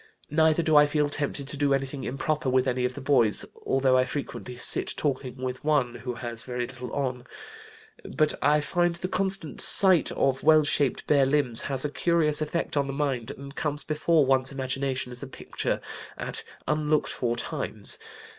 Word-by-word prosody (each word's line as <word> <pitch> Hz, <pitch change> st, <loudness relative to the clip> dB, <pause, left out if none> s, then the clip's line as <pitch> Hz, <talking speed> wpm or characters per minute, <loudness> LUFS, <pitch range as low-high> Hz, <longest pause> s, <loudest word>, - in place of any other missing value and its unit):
Neither 160 Hz, +1 st, +3 dB
do 155 Hz, -1 st, +2 dB
I 150 Hz, 0 st, +7 dB
feel 150 Hz, 0 st, 0 dB
tempted 145 Hz, -1 st, -3 dB
to 145 Hz, -, -4 dB
do 140 Hz, -1 st, +2 dB
anything 135 Hz, 0 st, -4 dB
improper 145 Hz, +1 st, -2 dB
with 130 Hz, 0 st, +2 dB
any 125 Hz, -1 st, 0 dB
of 125 Hz, 0 st, -3 dB
the 145 Hz, -, -7 dB
boys, 125 Hz, -6 st, +3 dB, 0.2 s
although 135 Hz, -1 st, +3 dB
I -, -, +4 dB
frequently 130 Hz, -2 st, -6 dB
sit -, -, +2 dB
talking 130 Hz, -3 st, -2 dB
with 130 Hz, +1 st, -5 dB
one 145 Hz, -5 st, +1 dB
who 120 Hz, +1 st, -6 dB
has 115 Hz, -1 st, -3 dB
very 125 Hz, -1 st, -3 dB
little 125 Hz, -1 st, -9 dB
on. 125 Hz, -3 st, -3 dB, 0.8 s
But 155 Hz, -1 st, 0 dB
I 150 Hz, 0 st, +3 dB
find 175 Hz, +3 st, 0 dB
the 175 Hz, +2 st, -4 dB
constant 190 Hz, -3 st, -1 dB
sight 185 Hz, -5 st, +5 dB
of 135 Hz, -1 st, 0 dB
well 155 Hz, 0 st, +5 dB
shaped 145 Hz, -2 st, 0 dB
bare 140 Hz, -3 st, +3 dB
limbs 135 Hz, -5 st, +1 dB
has 135 Hz, 0 st, -2 dB
a -, -, 0 dB
curious 155 Hz, -2 st, +2 dB
effect 155 Hz, +2 st, -2 dB
on 140 Hz, -1 st, +1 dB
the 135 Hz, -, -4 dB
mind 135 Hz, -5 st, -2 dB
and 140 Hz, 0 st, -9 dB
comes 150 Hz, -1 st, -2 dB
before 155 Hz, 0 st, +2 dB
one's 130 Hz, 0 st, +2 dB
imagination 130 Hz, -1 st, -3 dB
as 125 Hz, -, -5 dB
a 140 Hz, -, -6 dB
picture 130 Hz, -, -3 dB, 0.4 s
at -, -, +1 dB, 0.2 s
unlooked 150 Hz, 0 st, +1 dB
for 120 Hz, -2 st, -1 dB
times. 120 Hz, -, -2 dB
140 Hz, 185 wpm, -26 LUFS, 130-150 Hz, 0.8 s, I